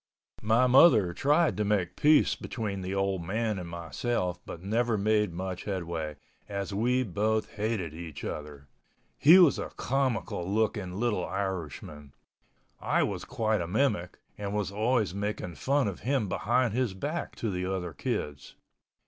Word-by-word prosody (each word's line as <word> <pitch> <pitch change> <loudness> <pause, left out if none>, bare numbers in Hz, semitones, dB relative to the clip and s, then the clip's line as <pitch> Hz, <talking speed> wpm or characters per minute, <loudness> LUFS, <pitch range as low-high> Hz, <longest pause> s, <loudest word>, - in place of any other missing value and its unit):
My 115 +4 +3
mother 125 - +6
tried 145 - +2
to 105 - +1
make 100 -4 0
peace 150 0 +4
between 105 -5 -4
the 95 +1 -3
old 95 -2 0
man 105 +3 -1
and 85 -2 -7
myself 90 +3 -2
but 85 - -8
never 115 +3 +1
made 105 -1 +2
much 90 +1 -5
headway, 85 -6 -3 0.3
as 100 0 -4
we 125 +5 +2
both 110 +1 -1
hated 105 -7 -2
each 80 -2 -8
other. 75 -2 -6 0.5
He 165 +6 +8
was 175 -7 +6
a - - -4
comical 125 -9 -1
looking 105 -3 0
little 110 -6 0
Irishman—I 85 -7 -5
was - - -3
quite 110 -3 0
a 85 - -3
mimic 105 -3 0 0.2
and 100 0 -3
was 105 -2 -1
always 110 -1 +1
making 100 -3 -3
fun 135 - +1
of 100 - -4
him 130 -2 0
behind 120 +4 +1
his 120 -5 0
back 150 - -4
to 110 - -2
the 90 0 -2
other 90 -3 -3
kids. 70 +1 -4
100 Hz, 150 wpm, -29 LUFS, 90-115 Hz, 0.5 s, He